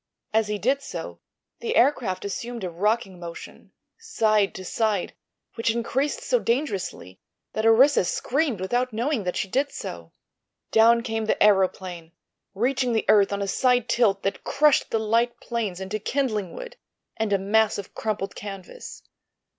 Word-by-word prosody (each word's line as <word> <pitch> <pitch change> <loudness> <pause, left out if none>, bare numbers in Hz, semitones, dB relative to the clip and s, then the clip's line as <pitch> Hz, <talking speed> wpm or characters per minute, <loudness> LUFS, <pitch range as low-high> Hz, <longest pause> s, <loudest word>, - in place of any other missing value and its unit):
As 220 -1 +2
he 210 0 -2
did 265 +7 +1
so - - -7 0.4
the 465 0 -2
aircraft 210 - +2
assumed 235 +3 -5
a 180 - -3
rocking 195 +1 -1
motion, 170 -1 -10 0.3
side 215 - +1
to 185 - -7
side, 215 -2 -1 0.4
which 230 - -1
increased 265 +5 -1
so - - +2
dangerously 230 - -2 0.3
that 220 +1 +1
Orissa 255 +2 +6
screamed 265 - -1
without 245 +7 0
knowing 235 -1 -1
that 180 - -2
she - - -1
did 275 +7 0
so. 85 -1 -7 0.6
Down 230 +1 +5
came 225 -2 -2
the 215 - +2
aëroplane, 185 -4 +1 0.4
reaching 250 +3 +1
the 220 - 0
earth 205 -2 +5
on 200 0 -1
a - - -3
side 245 +3 +2
tilt 205 -6 +2
that 195 - -2
crushed 300 -1 +3
the - - +1
light 230 +2 +1
planes 220 -7 -3
into 190 +3 -4
kindling 215 -7 -2
wood - - -9 0.4
and 220 -2 -1
a 200 - +4
mass 215 +3 +2
of 200 -1 -8
crumpled 210 -3 -3
canvas. 195 -3 -9
220 Hz, 155 wpm, -25 LUFS, 195-245 Hz, 0.6 s, Orissa